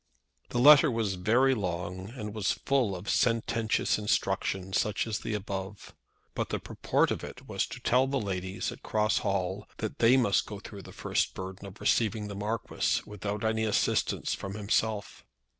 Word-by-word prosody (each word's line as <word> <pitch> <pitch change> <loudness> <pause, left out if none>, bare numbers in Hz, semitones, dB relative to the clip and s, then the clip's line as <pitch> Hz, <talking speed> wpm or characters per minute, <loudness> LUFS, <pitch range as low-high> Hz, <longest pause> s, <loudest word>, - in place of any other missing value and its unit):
The - - -3
letter 150 +4 +8
was 115 -5 0
very 115 +9 +3
long, 90 -2 -3
and 105 -4 -5
was 105 -3 0
full 130 -8 0
of 90 +3 -8
sententious 115 -2 +1
instructions, 95 -2 0
such 105 -1 -1
as 110 -3 -2
the 110 - -3
above. 100 0 -5 0.4
But - - -2
the - - -1
purport - - 0
of - - -3
it - - -9
was - - -1
to - - -8
tell 130 +2 +3
the 135 0 0
ladies 95 -2 -3
at - - -11
Cross 105 -1 +1
Hall 95 0 -2
that 110 - -4
they 120 +3 +6
must 110 -6 +2
go 105 -2 -7
through 100 -1 -9
the - - -12
first - - -1
burden 95 +1 -7
of 100 +2 -12
receiving 110 -2 +1
the 100 - -6
Marquis 105 +3 -1
without 105 +1 -4
any 110 0 +1
assistance 110 -2 +1
from 100 0 -5
himself. 105 0 -1
105 Hz, 175 wpm, -29 LUFS, 95-115 Hz, 0.4 s, letter